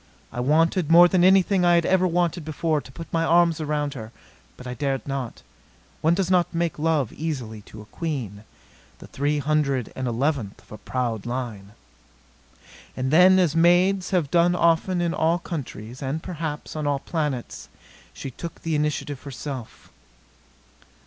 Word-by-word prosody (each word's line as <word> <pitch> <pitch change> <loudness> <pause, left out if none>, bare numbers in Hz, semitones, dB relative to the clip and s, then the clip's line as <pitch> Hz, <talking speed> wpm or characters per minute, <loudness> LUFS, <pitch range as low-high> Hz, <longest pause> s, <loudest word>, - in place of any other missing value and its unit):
I - - -4
wanted, 160 +5 +2
more 175 +1 +8
than 175 0 +2
anything 190 0 +4
I 175 0 +5
had 170 -1 +2
ever 185 0 +3
wanted 175 -1 0
before, 155 0 -1
to 130 - -14
put 165 +5 -10
my 165 0 +2
arms 170 -1 +3
around 150 -1 -1
her. 110 -5 -8 0.5
But 125 - -11
I 125 - -4
dared 135 +1 -2
not. 130 - -5 0.6
One 165 +2 +3
does 190 -1 -1
not 175 -2 +2
make 170 -2 -1
love 155 -6 0
easily 130 -9 -5
to 105 - -11
a 105 - -24
queen, 125 - -4 0.5
the - - -12
three 145 +2 -1
hundred 140 -4 0
and 130 -1 -3
eleventh 120 -3 -1
of - - -26
a 105 - -9
proud 120 -4 -3
line. 115 -5 -5 1.2
And 130 +1 -1
then, 180 +4 +7
as 175 -4 +2
maids 180 +3 +3
have 175 -7 0
done 175 +1 +4
often 170 +1 +2
in 170 -1 0
all 165 +2 +2
countries, 130 - -7
and, 140 +4 -3
perhaps, 160 -4 -5
on 155 -1 -2
all 145 -1 +1
planets, 145 -4 -4 0.4
she 135 - -7
took 170 +7 -9
the 165 - -2
initiative 150 -2 -2
herself. 135 -3 -8
155 Hz, 165 wpm, -24 LUFS, 130-170 Hz, 1.2 s, more